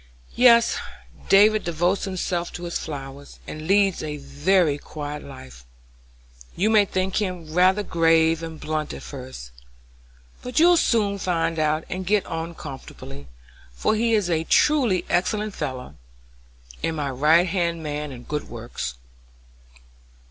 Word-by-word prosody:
"Yes, 235 Hz, -1 st, +5 dB, 0.5 s
David 210 Hz, +2 st, +5 dB
devotes 175 Hz, +3 st, 0 dB
himself 180 Hz, -2 st, -2 dB
to 175 Hz, -, -7 dB
his 170 Hz, 0 st, -3 dB
flowers, 140 Hz, -2 st, -8 dB
and 155 Hz, 0 st, -7 dB
leads 195 Hz, -1 st, +3 dB
a 150 Hz, -1 st, -4 dB
very 145 Hz, +3 st, +1 dB
quiet 145 Hz, 0 st, -7 dB
life. 65 Hz, -, -12 dB, 0.9 s
You 210 Hz, +5 st, +1 dB
may 210 Hz, -2 st, +5 dB
think 185 Hz, 0 st, -2 dB
him 180 Hz, -6 st, -3 dB
rather 185 Hz, +4 st, +4 dB
grave 165 Hz, -2 st, +3 dB
and 165 Hz, -1 st, -7 dB
blunt 155 Hz, -1 st, -3 dB
at -, -, -10 dB
first, 130 Hz, -, -9 dB, 0.9 s
but 250 Hz, +4 st, -1 dB
you'll 350 Hz, +2 st, +6 dB
soon 205 Hz, -9 st, +1 dB
find 165 Hz, -3 st, -1 dB
him -, -, +3 dB
out 155 Hz, +1 st, 0 dB
and 185 Hz, +1 st, -4 dB
get 205 Hz, -1 st, +2 dB
on 165 Hz, +1 st, -5 dB
comfortably, 70 Hz, -, -10 dB, 0.5 s
for 140 Hz, -, +1 dB
he 230 Hz, +1 st, +1 dB
is 205 Hz, -4 st, +1 dB
a 165 Hz, -2 st, 0 dB
truly 245 Hz, -, +3 dB
excellent 210 Hz, +3 st, 0 dB
fellow, 130 Hz, -6 st, -6 dB, 0.8 s
and 165 Hz, -, -1 dB
my 145 Hz, -2 st, -2 dB
right 155 Hz, +7 st, +4 dB
hand 170 Hz, -2 st, -1 dB
man 150 Hz, -1 st, -4 dB
in 125 Hz, -2 st, -10 dB
good 150 Hz, +2 st, -4 dB
works." 115 Hz, -, -6 dB
165 Hz, 140 wpm, -23 LUFS, 150-195 Hz, 0.9 s, you'll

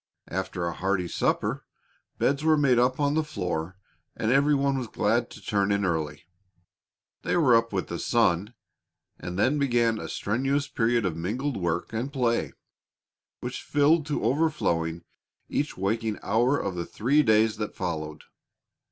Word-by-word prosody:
After 95 Hz, -1 st, -3 dB
a 85 Hz, -, -2 dB
hearty 95 Hz, -1 st, -1 dB
supper, -, -, -1 dB, 0.5 s
beds 140 Hz, +2 st, +1 dB
were 160 Hz, -1 st, +4 dB
made 135 Hz, -4 st, +4 dB
up 125 Hz, +2 st, +2 dB
on 145 Hz, 0 st, +2 dB
the 160 Hz, +1 st, +1 dB
floor 90 Hz, -, -4 dB, 0.4 s
and 110 Hz, -, 0 dB
every 140 Hz, +2 st, +4 dB
one 140 Hz, 0 st, +1 dB
was 125 Hz, -, -4 dB
glad 115 Hz, +3 st, 0 dB
to -, -, -11 dB
turn 100 Hz, -2 st, +1 dB
in 100 Hz, 0 st, +1 dB
early. 80 Hz, -3 st, -2 dB, 1.0 s
They -, -, 0 dB
were 135 Hz, -8 st, +5 dB
up 115 Hz, 0 st, +2 dB
with 95 Hz, -2 st, -1 dB
the 85 Hz, -, -5 dB
sun, 110 Hz, -2 st, +1 dB, 0.6 s
and 90 Hz, 0 st, -6 dB
then 130 Hz, +9 st, +2 dB
began 120 Hz, -5 st, +2 dB
a -, -, -6 dB
strenuous 135 Hz, +7 st, -1 dB
period 115 Hz, -3 st, +1 dB
of 90 Hz, -4 st, -1 dB
mingled 120 Hz, -, -2 dB
work 85 Hz, +2 st, -2 dB
and 120 Hz, +5 st, -2 dB
play 120 Hz, -4 st, 0 dB, 0.9 s
which -, -, -5 dB
filled 145 Hz, +2 st, +2 dB
to 150 Hz, -, -2 dB
overflowing 85 Hz, -, 0 dB, 0.5 s
each 145 Hz, -, -2 dB
waking 110 Hz, +3 st, -1 dB
hour 120 Hz, +7 st, +2 dB
of 100 Hz, -, -2 dB
the 85 Hz, -1 st, -4 dB
three 135 Hz, +8 st, +2 dB
days 110 Hz, -3 st, +3 dB
that 105 Hz, -1 st, -4 dB
followed. 80 Hz, -4 st, -4 dB
115 Hz, 160 wpm, -26 LUFS, 95-140 Hz, 1.0 s, were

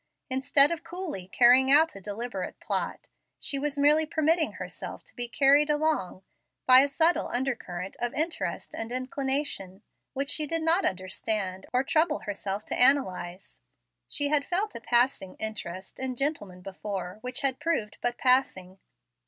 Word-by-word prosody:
Instead 270 Hz, +3 st, +5 dB
of 335 Hz, -, -4 dB
coolly 345 Hz, -, -6 dB
carrying 250 Hz, +6 st, +5 dB
out 315 Hz, +3 st, +5 dB
a 195 Hz, -, -9 dB
deliberate 205 Hz, 0 st, -5 dB
plot, -, -, -3 dB, 0.3 s
she 280 Hz, -, -2 dB
was 290 Hz, 0 st, -2 dB
merely 295 Hz, +2 st, +4 dB
permitting 315 Hz, +1 st, +1 dB
herself -, -, -7 dB
to -, -, -14 dB
be 245 Hz, -1 st, +1 dB
carried 280 Hz, +4 st, +4 dB
along 295 Hz, -, 0 dB, 0.4 s
by 255 Hz, 0 st, +8 dB
a 275 Hz, -, +4 dB
subtle 320 Hz, +5 st, +2 dB
undercurrent 235 Hz, -8 st, -4 dB
of 240 Hz, 0 st, -1 dB
interest 325 Hz, +3 st, -2 dB
and 225 Hz, +1 st, -5 dB
inclination, 255 Hz, -6 st, -3 dB, 0.3 s
which 280 Hz, +1 st, -2 dB
she 305 Hz, -1 st, +2 dB
did 330 Hz, +1 st, -1 dB
not 330 Hz, +4 st, +3 dB
understand, 190 Hz, +1 st, -2 dB
or 250 Hz, +1 st, +2 dB
trouble 310 Hz, +2 st, +1 dB
herself 205 Hz, 0 st, -4 dB
to -, -, -3 dB
analyze. 190 Hz, -9 st, +1 dB, 0.5 s
She 285 Hz, -1 st, 0 dB
had 295 Hz, -1 st, +3 dB
felt 390 Hz, +7 st, -2 dB
a 235 Hz, -, -8 dB
passing 240 Hz, -6 st, +1 dB
interest 190 Hz, -4 st, -5 dB
in 260 Hz, -1 st, -1 dB
gentlemen 220 Hz, -10 st, -3 dB
before, 195 Hz, 0 st, -6 dB
which 250 Hz, 0 st, -3 dB
had 265 Hz, -2 st, 0 dB
proved 270 Hz, -11 st, -2 dB
but 240 Hz, 0 st, -1 dB
passing. 195 Hz, -8 st, +1 dB
255 Hz, 155 wpm, -27 LUFS, 200-295 Hz, 0.5 s, by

